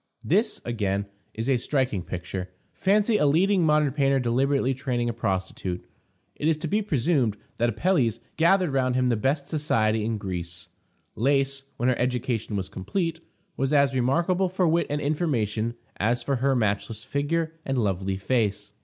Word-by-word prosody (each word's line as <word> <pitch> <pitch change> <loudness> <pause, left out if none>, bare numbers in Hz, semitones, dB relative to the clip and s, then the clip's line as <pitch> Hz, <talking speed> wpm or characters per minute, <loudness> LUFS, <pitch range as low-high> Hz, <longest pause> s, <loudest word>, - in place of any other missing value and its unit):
This, - - +1
again, 100 -4 -1 0.3
is 115 +2 -3
a 135 -2 +3
striking 125 -6 0
picture. 90 +2 -5 0.2
Fancy 210 +3 +2
a 150 - +3
leading 180 +5 +3
modern 150 -2 +3
painter 135 -1 +2
deliberately 135 +2 +1
training 125 -3 -1
a - - -2
prostitute! 95 -4 -3 0.5
It 150 - -1
is 160 -1 +3
to 160 +1 -4
be 210 +7 +1
presumed 140 - +1 0.2
that 120 +1 +2
Apelles 120 - +1 0.2
gathered 175 0 +3
round 130 -2 +1
him 130 -1 +2
the 120 - +2
best 135 +6 0
society 110 -8 +1
in 110 0 -1
Greece. 85 -3 -6 0.5
Lais, 135 +2 +1 0.2
when 120 - 0
her 130 - +2
education 125 -3 -1
was 95 -2 -2
complete, 165 - -3 0.4
was 135 +1 -1
as 140 -2 +4
remarkable 170 +9 +1
for 185 -1 +1
wit 170 +1 +2
and 145 +1 -1
information 120 - 0 0.2
as 120 +3 +1
for 135 +1 0
her 135 +2 +2
matchless 105 -1 -1
figure 160 +3 -1
and 135 -2 -2
lovely 95 -3 0
face. 105 -1 -1
130 Hz, 165 wpm, -26 LUFS, 110-150 Hz, 0.5 s, as